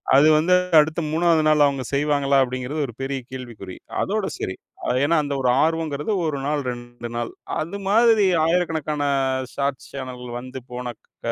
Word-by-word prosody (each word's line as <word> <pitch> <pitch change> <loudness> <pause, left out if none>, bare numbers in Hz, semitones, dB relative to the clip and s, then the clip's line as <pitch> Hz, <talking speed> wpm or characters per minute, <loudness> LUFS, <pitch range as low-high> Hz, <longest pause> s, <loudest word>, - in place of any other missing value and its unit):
அது 140 +3 +7
வந்து 165 +4 +3 0.3
அடுத்த 155 +2 +1
3வது 165 0 +3
நாள் 150 -1 +5
அவங்க 140 -2 0
செய்வாங்களா 140 -1 +2
அப்டிங்குறது 130 +4 -3
ஒரு 120 - -9
பெரிய 135 0 -2
கேள்விக்குறி. 120 -8 -8 0.3
அதோட 210 0 -1
சரி. 95 - -3 0.5
ஏன்னா 165 +3 +3
அந்த 145 -1 -3
ஒரு 125 - +2
ஆர்வம்ங்கிறது 160 +1 -1
1 155 -3 -1
நாள், 150 0 0
2 120 -1 -8
நாள். 120 0 -3 0.3
அது 170 +6 -4
மாதிரி 225 -1 +5 0.2
1,000கணக்கான 160 -3 0 0.5
ஷார்ட்ஸ் 140 -1 -2
சேனல் 130 -2 -6
வந்து 130 +1 -8
போன 125 0 -5
க - - -52
145 Hz, 155 wpm, -23 LUFS, 130-160 Hz, 0.5 s, அது